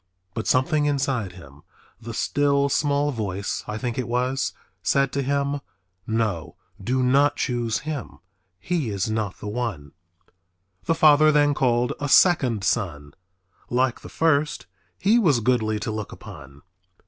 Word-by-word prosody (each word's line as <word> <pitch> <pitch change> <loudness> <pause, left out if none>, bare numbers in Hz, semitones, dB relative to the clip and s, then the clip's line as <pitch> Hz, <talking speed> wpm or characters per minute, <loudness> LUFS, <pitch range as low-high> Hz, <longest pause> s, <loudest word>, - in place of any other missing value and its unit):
But 115 - -4
something 145 +3 +2
inside 135 -9 -1
him, 70 -5 -14 0.4
"the 115 0 -7
still 140 +2 +1
small 145 0 +1
voice" 100 -5 -3
I 105 - -4
think 120 +1 -3
it 125 - -2
was, 125 +3 0 0.3
said 135 -1 +2
to 140 - 0
him, 140 +1 -1 0.5
"No, 110 -7 -2 0.3
do 130 +4 0
not 140 +3 +3
choose 120 -2 -1
him, 150 -5 -5 0.4
he 160 - -2
is 100 +1 -2
not 110 -3 -2
the - - -8
one." 105 - -4 0.9
The 165 - +1
father 155 -1 +6
then 145 -1 +3
called 125 -2 +1
a 145 -1 -3
second 130 - +4
son. 85 -10 -2 0.6
Like 125 0 +1
the - - -11
first 150 -9 +1 0.3
he 215 +5 +3
was 155 - +3
goodly 110 -2 +1
to - - -3
look 110 -1 -5
upon. 70 +1 -12
125 Hz, 145 wpm, -24 LUFS, 110-145 Hz, 0.9 s, father